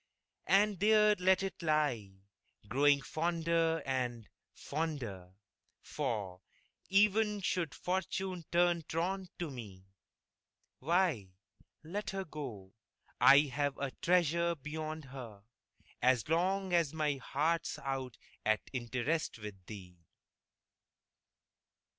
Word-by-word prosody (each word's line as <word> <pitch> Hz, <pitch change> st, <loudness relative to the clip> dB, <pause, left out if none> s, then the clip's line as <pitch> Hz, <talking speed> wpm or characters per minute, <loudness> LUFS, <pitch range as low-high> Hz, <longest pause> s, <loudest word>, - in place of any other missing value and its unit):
And 200 Hz, -1 st, +4 dB
there 210 Hz, +1 st, +5 dB
let 190 Hz, +1 st, +3 dB
it 195 Hz, -1 st, -4 dB
lie, 150 Hz, -10 st, +1 dB, 0.6 s
growing 140 Hz, +3 st, +3 dB
fonder 165 Hz, 0 st, 0 dB
and, 125 Hz, -4 st, -2 dB, 0.2 s
fonder 120 Hz, -, -4 dB, 0.5 s
For, 105 Hz, -10 st, -3 dB, 0.5 s
even 210 Hz, +2 st, +3 dB
should 170 Hz, -4 st, -1 dB
Fortune 185 Hz, 0 st, -2 dB
turn 175 Hz, 0 st, +3 dB
truant 185 Hz, +3 st, -2 dB
to 170 Hz, -4 st, -4 dB
me, 100 Hz, -7 st, -9 dB, 0.9 s
Why, 150 Hz, -, +1 dB, 0.5 s
let 200 Hz, +7 st, -4 dB
her 195 Hz, 0 st, -3 dB
go 120 Hz, -, -8 dB, 0.5 s
I've 140 Hz, 0 st, +5 dB
a 140 Hz, -1 st, -3 dB
treasure 170 Hz, -1 st, +2 dB
beyond 155 Hz, +1 st, -5 dB
her, 120 Hz, -6 st, -10 dB, 0.6 s
As 125 Hz, -3 st, +3 dB
long 185 Hz, +3 st, +1 dB
as 165 Hz, -3 st, +2 dB
my 150 Hz, -3 st, 0 dB
heart's 155 Hz, +6 st, -1 dB
out 135 Hz, -3 st, -4 dB, 0.3 s
at 110 Hz, 0 st, 0 dB
interest 130 Hz, +6 st, -1 dB
With 105 Hz, -4 st, -9 dB
thee! 90 Hz, -4 st, -10 dB
155 Hz, 100 wpm, -33 LUFS, 125-175 Hz, 0.9 s, there